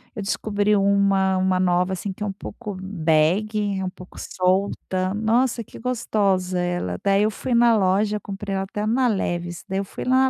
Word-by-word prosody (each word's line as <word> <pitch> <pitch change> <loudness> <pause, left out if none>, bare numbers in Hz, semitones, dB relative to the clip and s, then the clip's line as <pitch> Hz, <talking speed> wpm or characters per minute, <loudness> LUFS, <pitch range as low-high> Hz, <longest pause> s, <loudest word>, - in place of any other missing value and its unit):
eu 210 - -4
descobri 205 +1 0
uma 195 -1 +3
uma 185 0 +1
nova, 180 +1 +2
assim, 190 +1 -4
que 210 - -21
é - - -1
um 200 - -2
pouco 205 +1 -7
bag, 190 +4 +1
é - - -2
um 185 - -2
pouco 180 0 -14
solta. 185 0 -1
Nossa, 230 +2 +1
que - - -13
gostosa 200 -7 0
ela. 175 - -2
Daí 200 +1 +3
eu 215 - +2
fui 245 +4 -3
na 235 -1 +5
loja, 205 +2 +2
comprei 200 0 -5
ela 195 - -1
até 210 +2 -4
na 250 +3 +2
Levis, 175 -5 -2
daí 190 0 -1
eu 200 - -2
fui - - -7
lá 260 +1 +4
195 Hz, 190 wpm, -23 LUFS, 185-215 Hz, -, na